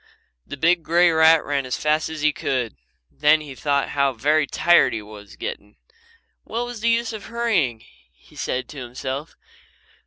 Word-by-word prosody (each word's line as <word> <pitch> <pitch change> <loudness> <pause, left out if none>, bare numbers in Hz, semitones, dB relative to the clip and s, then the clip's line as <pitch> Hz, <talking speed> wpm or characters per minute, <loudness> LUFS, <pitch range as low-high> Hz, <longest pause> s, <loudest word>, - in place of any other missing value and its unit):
The 145 - -7
big 170 +4 +3
grey 170 +2 +3
rat 160 0 +5
ran 140 -1 -1
as 125 - -2
fast 155 +1 0
as 160 -2 -6
he 155 -1 +3
could. 125 -6 -2 0.4
Then 150 +2 +3
he 150 -3 -9
thought 140 +3 -1
how 140 -1 +1
very 145 +5 +1
tired 175 -6 +4
he 110 - -3
was 105 -1 -13
getting. 105 +1 -7 0.7
"What's 240 0 -4
the 230 +2 +1
use 230 0 0
of 215 -2 -8
hurrying?" 195 - 0 0.3
he - - -23
said 130 - -3
to 145 - -9
himself. 130 +5 -6
150 Hz, 165 wpm, -22 LUFS, 130-170 Hz, 0.7 s, rat